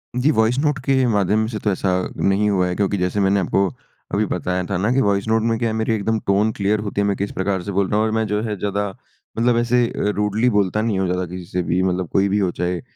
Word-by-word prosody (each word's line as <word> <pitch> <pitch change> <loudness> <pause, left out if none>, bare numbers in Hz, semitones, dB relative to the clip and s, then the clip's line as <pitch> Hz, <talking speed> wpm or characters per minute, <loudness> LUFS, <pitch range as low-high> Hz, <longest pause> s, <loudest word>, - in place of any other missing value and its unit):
जी 125 +4 +2
voice 110 0 +2
note 150 -1 +1
के 135 -2 +3
माध्यम 105 0 +2
से 110 -2 -4
तो 105 - +2
ऐसा 95 +1 -1 0.3
नहीं 100 +2 +2
हुआ 90 -2 +2
है। 90 - -2
क्योंकि 100 +1 0
जैसे 90 +2 -1
मैंने 100 0 +3
आपको 95 +1 +1 0.5
अभी - - +2
बताया 90 0 -2
था 100 - 0
ना 100 +6 0
कि 135 +2 +3
वॉइस 100 -1 +1
नोट 110 0 +2
में 115 - +1
क्या 115 - 0
है - - -2
मेरी 110 0 0
एकदम 110 +1 0
टोन 100 +3 +3
क्लियर 105 0 0
होती 100 -1 -2
है। - - +1
मैं 100 - +1
किस 100 +1 -3
प्रकार 95 0 -1
से 100 - -4
बोल 100 0 +1
रहा 105 - +1
हूँ। 110 - +2
और 110 - -1
मैं 110 0 0
जो 105 +1 -1
है 105 -2 -2
ज़्यादा 100 0 -1 0.5
मतलब 120 0 +3
ऐसे 120 +1 +2
अ, - - -4
रूडली 105 +4 +1
बोलता 105 0 +1
नहीं 110 -3 0
हूँ 95 - +1
ज़्यादा 90 +1 -1
किसी 90 +1 -8
से 90 - 0
भी 90 +2 0
मतलब 90 -1 0
कोई 100 0 +3
भी 100 +2 +1
हो 95 -3 +1
चाहे 90 -1 -2
100 Hz, 275 wpm, -21 LUFS, 95-110 Hz, 0.5 s, के